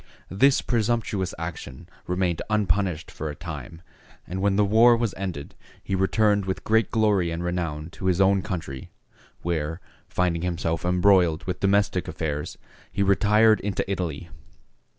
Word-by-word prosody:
This 135 +8 +3
presumptuous 110 -5 0
action 80 -1 -7 0.2
remained 90 -2 0
unpunished 95 -5 0
for 80 - -5
a 75 - -6
time, 80 0 -8 0.4
and 95 +2 -5
when 100 0 +2
the 105 +1 +3
war 115 +4 +5
was 115 -4 -1
ended 90 -7 -5 0.3
he 100 - -4
returned 100 +1 +2
with 95 0 -3
great 110 -2 +2
glory 105 -6 +2
and 85 +1 -4
renown 85 -3 -3
to 95 - -5
his 90 -1 +2
own 95 0 +4
country, 85 - -6 0.5
where, 80 -1 -2 0.3
finding 85 -2 0
himself 85 -2 -2
embroiled 90 -2 +3
with 90 -1 -4
domestic 100 -2 +1
affairs, 75 -2 -4 0.3
he 100 - 0
retired 105 +2 +4
into 100 -1 -2
Italy. 90 -4 -3
95 Hz, 145 wpm, -25 LUFS, 85-100 Hz, 0.5 s, war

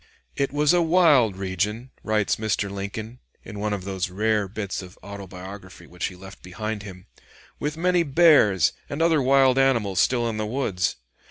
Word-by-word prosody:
"It 140 - -1
was 150 +2 +2
a 175 - +4
wild 160 - +4
region," 100 +6 -3
writes 105 -2 0
Mr. 105 -2 -1
Lincoln, 105 +4 -6 0.2
in 105 -2 -9
one 105 +1 -2
of 100 -3 -3
those 95 -1 -3
rare 105 +2 0
bits 100 -1 -5
of 90 0 -13
autobiography 95 -2 -10
which 90 +2 -5
he 90 - -9
left 95 +2 -13
behind 105 +4 -5
him, 95 -3 -11 0.5
"with 150 +1 -3
many 180 +1 +2
bears 140 - +4 0.2
and 140 - -4
other 165 -3 +3
wild 135 0 +4
animals 115 -8 +2
still 120 -2 +2
in 110 -2 -3
the 110 0 -2
woods. 105 -7 -1
105 Hz, 170 wpm, -24 LUFS, 95-135 Hz, 0.5 s, a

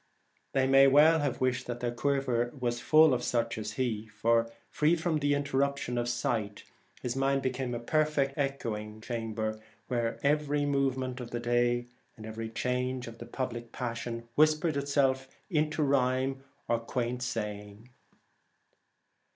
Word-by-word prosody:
They 135 -1 +3
may 135 +1 +7
well 150 +4 +6
have 140 -3 -1
wished 130 0 0
that 120 -1 -4
their 120 -1 -1
quiver 120 -2 0
were 120 -1 +1
full 155 +5 +5
of 125 - 0
such 115 -2 -1
as 105 0 -4
he, 110 -3 -2
for, 115 +2 +1 0.2
free 155 +3 +3
from 160 -2 0
the 145 0 +2
interruption 140 -2 0
of 120 0 0
sight, 110 -4 -2 0.4
his 125 0 -2
mind 135 0 +1
became 130 -1 -2
a - - -3
perfect 150 +1 +1
echoing 110 -7 -3
chamber, 110 -2 -3 0.3
where 120 -2 -1
every 145 0 +2
movement 130 -2 0
of 120 -2 -6
the 120 - -3
day 120 0 +1 0.3
and 110 - -9
every 110 0 -5
change 125 +2 -2
of 115 0 -10
public 120 -3 -4
passion 115 -1 -4
whispered 155 +2 +3
itself 140 -2 +1 0.2
into 155 -1 +1
rhyme 135 -1 +1 0.2
or 115 - +1
quaint 120 +1 -3
saying. 105 -2 -5
125 Hz, 145 wpm, -30 LUFS, 115-140 Hz, 0.4 s, may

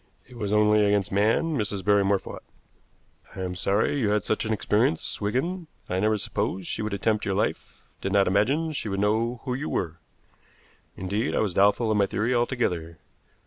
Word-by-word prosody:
"It 125 - -15
was 105 -4 -3
only 105 0 +4
against 100 -2 +1
man 110 +11 +2
Mrs. 105 -5 -2
Barrymore 100 -1 +4
fought. - - -9 0.9
I - - -5
am 90 -1 -3
sorry 100 +10 0
you 110 -5 +1
had 105 0 +1
such 110 - -1
an 110 - -2
experience, 105 -4 0
Wigan. 160 - -2 0.2
I 90 - -1
never 110 +2 +2
supposed 95 -2 -2
she - - -3
would 105 -1 -2
attempt 105 +2 0
your 95 - -1
life, 105 - -3 0.2
did 95 - -2
not 100 -1 +4
imagine 135 - +1
she 135 -7 -3
would 95 0 -2
know 115 +4 0
who 130 - -2
you 140 +5 -3
were. 85 0 -2 1.0
Indeed, 100 +5 -2
I - - +1
was 105 -5 0
doubtful 105 +4 +3
of 105 - +2
my 100 -1 +3
theory 110 +6 0
altogether. 100 -10 -1
105 Hz, 185 wpm, -26 LUFS, 100-115 Hz, 1.0 s, only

